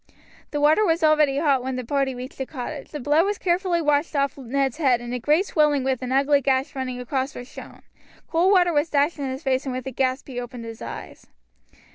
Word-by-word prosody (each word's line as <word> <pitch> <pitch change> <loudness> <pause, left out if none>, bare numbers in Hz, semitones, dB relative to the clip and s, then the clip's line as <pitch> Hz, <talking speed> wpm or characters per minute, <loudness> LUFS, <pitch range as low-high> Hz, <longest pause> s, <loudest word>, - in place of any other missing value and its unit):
The 295 - -3
water 305 +8 +4
was 330 -4 +1
already 305 -3 +4
hot 285 -3 +2
when 260 +1 -3
the 255 -1 -4
party 275 0 0
reached 255 +3 -9
the 265 - -3
cottage; 280 +1 -6
the 300 - -6
blood 295 +5 +3
was 410 +1 -1
carefully 350 -1 0
washed 295 +1 +1
off 280 -1 +1
Ned's 270 0 -2
head, 265 -7 +3
and 240 0 -6
a 250 - -2
great 300 - +2
swelling 300 -6 +2
with 265 -1 -1
an 255 0 -4
ugly 280 +2 +3
gash 265 0 0
running 255 -2 -4
across 265 +2 -3
was 245 - -8
shown. - - -12 0.4
Cold 345 +4 +2
water 355 -3 +4
was 295 +2 +1
dashed 290 +2 +1
in 275 -2 -2
his 260 +4 -6
face, 265 +1 0
and 255 - -2
with 255 - -5
a 265 - -4
gasp 260 +1 -1
he 250 -3 -5
opened 245 -1 -7
his 225 0 -9
eyes. - - -8
275 Hz, 230 wpm, -24 LUFS, 260-305 Hz, 0.4 s, water